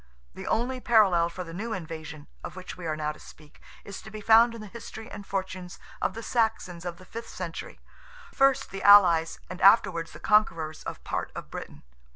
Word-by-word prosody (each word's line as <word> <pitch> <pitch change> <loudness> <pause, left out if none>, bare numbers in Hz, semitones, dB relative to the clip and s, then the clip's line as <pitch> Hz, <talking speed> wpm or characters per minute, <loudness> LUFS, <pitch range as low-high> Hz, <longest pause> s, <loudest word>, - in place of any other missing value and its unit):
The - - -8
only 255 +3 0
parallel 195 -9 +4
for 180 +2 -6
the 165 -1 -10
new 220 +6 -4
invasion, 160 -4 -7 0.2
of - - -7
which 185 -1 -8
we 180 -2 -7
are 155 - -1
now 150 0 -2
to 150 - -14
speak, 150 -1 -16 0.2
is 200 - -8
to - - -11
be 215 0 -8
found 230 +2 +5
in 230 - -8
the - - -8
history 220 +2 -9
and 200 - -9
fortunes 185 -2 -4 0.2
of - - -1
the 230 - -6
Saxons 220 -8 -1
of 175 -1 -4
the 185 - -15
fifth 230 +4 -8
century, 175 -3 -7 0.5
first 275 0 +3
the 195 - -6
allies 180 -5 +6
and 185 - -8
afterwards 175 -5 +4
the - - -11
conquerors 165 -7 +2
of - - -6
part - - -3
of - - -8
Britain. - - -8
185 Hz, 200 wpm, -27 LUFS, 170-220 Hz, 0.5 s, allies